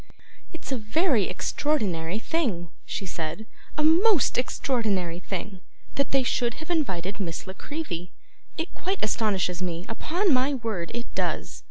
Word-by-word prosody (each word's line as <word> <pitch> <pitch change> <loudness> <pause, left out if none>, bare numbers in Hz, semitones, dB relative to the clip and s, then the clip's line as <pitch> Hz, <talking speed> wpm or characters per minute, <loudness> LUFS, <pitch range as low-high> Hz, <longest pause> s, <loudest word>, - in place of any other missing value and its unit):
'It's 330 -4 -7
a 260 - +1
very 225 - +3
extraordinary 195 - 0
thing,' 220 - -1 0.2
she 195 - -3
said, 170 +3 -4 0.3
'a 305 - +2
most 340 - +5
extraordinary 210 -9 +1
thing, 190 0 -5 0.3
that 280 - +1
they 270 -1 +3
should 240 -2 +1
have 315 +3 -6
invited 200 - 0
Miss 170 -5 -3
La 190 - -6
Creevy. 190 - -4 0.5
It 325 +2 -3
quite 380 +2 -2
astonishes 195 -5 +1
me, 175 -1 -2
upon 345 - +1
my 265 +2 +3
word 220 -9 -2
it 240 0 -5
does. - - -1
220 Hz, 145 wpm, -27 LUFS, 180-295 Hz, 0.5 s, most